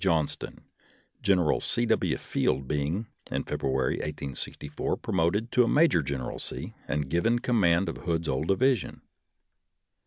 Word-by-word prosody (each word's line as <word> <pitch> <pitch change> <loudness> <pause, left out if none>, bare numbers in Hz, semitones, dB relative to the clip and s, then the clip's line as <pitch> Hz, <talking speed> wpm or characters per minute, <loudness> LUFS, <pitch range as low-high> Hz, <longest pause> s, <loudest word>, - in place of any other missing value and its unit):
Johnston, 80 -6 0 0.6
General 90 -5 +3
0. - - +1
W. - - +2
Field 65 0 -1
being, 75 - -1 0.2
in - - -1
February, 65 -1 0
1864, 75 0 -3
promoted 100 +8 0
to 125 -1 +5
a - - +1
major 150 - +4
generalcy 70 -3 -4
and 75 -2 -1
given 85 - +2
command 100 -7 +2
of - - -3
Hood's 85 -1 -2
old 65 +3 -1
division. 125 +2 +1
85 Hz, 125 wpm, -28 LUFS, 75-105 Hz, 0.6 s, to